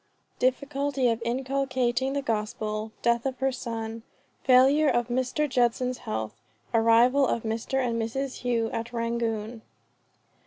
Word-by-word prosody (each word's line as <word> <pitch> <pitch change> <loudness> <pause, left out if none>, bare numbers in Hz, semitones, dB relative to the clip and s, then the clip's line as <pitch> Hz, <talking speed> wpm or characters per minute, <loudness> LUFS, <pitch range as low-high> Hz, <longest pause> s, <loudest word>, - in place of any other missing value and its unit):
DIFFICULTY 275 0 +1
OF 230 0 -1
INCULCATING 260 0 0
THE 280 0 -1
GOSPEL. 215 -1 -2
DEATH 235 0 +2
OF 260 -1 -4
HER 270 +1 +1
SON. 230 -2 -5 0.4
FAILURE 270 +4 +5
OF 240 -1 +1
MR. 260 +4 0
JUDSON'S 250 -1 +1
HEALTH. 110 0 -4 0.4
ARRIVAL 235 +4 +5
OF 230 - -1
MR. 230 +4 -1
AND 230 -1 -1
MRS. 260 +4 -3
HOUGH 235 -2 0
AT 230 +2 -4
RANGOON. 230 -1 -2
240 Hz, 125 wpm, -27 LUFS, 230-265 Hz, 0.4 s, FAILURE